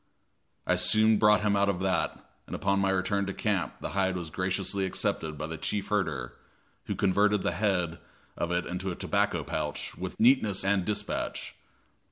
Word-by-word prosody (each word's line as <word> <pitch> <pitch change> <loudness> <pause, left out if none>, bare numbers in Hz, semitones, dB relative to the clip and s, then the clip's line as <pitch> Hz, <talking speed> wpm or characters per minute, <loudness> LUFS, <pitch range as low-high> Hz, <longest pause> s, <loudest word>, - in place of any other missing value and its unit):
I 90 - +2
soon 110 +4 +4
brought 105 -1 +5
him 105 -1 +2
out 100 0 +3
of 95 -3 -1
that, 95 -2 0 0.3
and - - -5
upon 100 0 +1
my 100 0 +2
return 95 +1 0
to 100 - -4
camp 100 -5 -1
the - - -3
hide 95 -1 +1
was 85 -3 -5
graciously 95 +2 -1
accepted 80 -4 -1
by 75 - -4
the 80 +1 -6
chief 100 -1 -2
herder, 85 -10 -1 0.5
who - - -3
converted 100 +1 +2
the - - +1
head 90 -3 0 0.4
of 85 - -2
it 90 0 0
into 90 +2 -3
a 90 - -3
tobacco - - 0
pouch - - -4
with - - -6
neatness 110 -6 +4
and 100 -2 +2
dispatch. 105 - -3
95 Hz, 180 wpm, -29 LUFS, 90-100 Hz, 0.5 s, brought